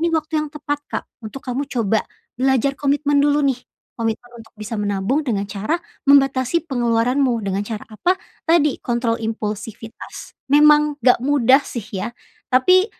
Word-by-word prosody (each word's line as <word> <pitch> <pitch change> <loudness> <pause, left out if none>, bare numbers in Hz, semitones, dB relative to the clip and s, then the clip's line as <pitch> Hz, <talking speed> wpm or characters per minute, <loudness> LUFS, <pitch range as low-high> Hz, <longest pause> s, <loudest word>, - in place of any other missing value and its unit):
ini 340 - +2
waktu 320 0 -1
yang 305 - -5
tepat 290 -1 -3
Kak, - - -3 0.2
untuk 220 +5 -7
kamu 255 +3 -2
coba, 225 -3 +1 0.3
belajar 265 +2 +2
komitmen 285 0 +1
dulu 290 0 +3
nih. 250 - -11 0.4
Komitmen 230 +2 -3
untuk 225 0 -15
bisa 215 +1 -6
menabung 205 +8 -1
dengan 205 -5 0
cara, 205 +9 -3 0.3
membatasi 275 +2 +4
pengeluaranmu, 240 0 +1
dengan 195 0 -1
cara 220 -2 -5
apa, 350 - +1 0.3
tadi, 310 -4 +3
kontrol 235 -1 -1
impulsivitas. 220 0 -6
Memang, 300 +1 +5
enggak 250 -2 +5
mudah 270 0 +4
sih 235 - -5
ya. 210 +4 -4 0.3
Tapi, 365 - +4
250 Hz, 150 wpm, -20 LUFS, 225-290 Hz, 0.4 s, Memang